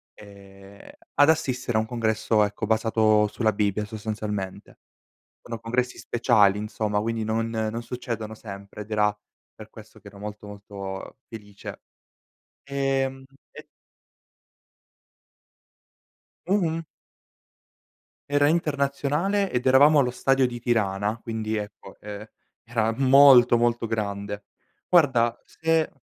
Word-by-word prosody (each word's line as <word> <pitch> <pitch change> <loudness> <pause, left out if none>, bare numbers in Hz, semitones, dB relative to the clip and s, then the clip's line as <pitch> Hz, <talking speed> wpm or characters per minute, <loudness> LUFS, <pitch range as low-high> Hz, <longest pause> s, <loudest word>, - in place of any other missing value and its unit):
ehm, 100 -1 -15 0.3
ad 145 +1 +5
assistere 130 -7 0
a - - +4
un 110 - -1
congresso, 110 -2 +1
ecco, 105 +1 -3
basato 110 -1 +3
sulla 110 +1 0
Bibbia 105 0 0
sostanzialmente. 105 -2 -5 0.6
Sono 115 -2 -7
congressi 125 +2 -2
speciali, 105 -4 +3
insomma, 105 0 -2
quindi 115 0 -2
non 115 +1 -1
non 110 +1 -3
succedono 115 -3 -5
sempre, 100 -1 -10
ed 105 - -10
era 105 -1 +2 0.4
per 110 0 -13
questo 110 -1 -15
che - - -15
ero 100 0 -13
molto, 105 0 -8
molto 100 0 -8
felice. 105 -3 -10 0.8
Ehm, 135 -1 -1 0.3
e - - -12 2.8
Mh-mh. 170 -4 0 1.5
Era 145 0 +3
internazionale 150 +5 0
ed 125 +1 -1
eravamo 145 +3 +6
allo 125 -3 +2
stadio 135 +1 +2
di 120 -1 -6
Tirana 105 -2 0
quindi, 110 -1 -3
ecco, 105 0 -8
ehm, 105 0 -8 0.4
era 115 -1 0
molto, 130 -3 +7
molto 120 0 +1
grande. 100 -2 -4 0.4
Guarda, 125 -9 +3
se 160 0 0
110 Hz, 115 wpm, -25 LUFS, 105-130 Hz, 2.8 s, molto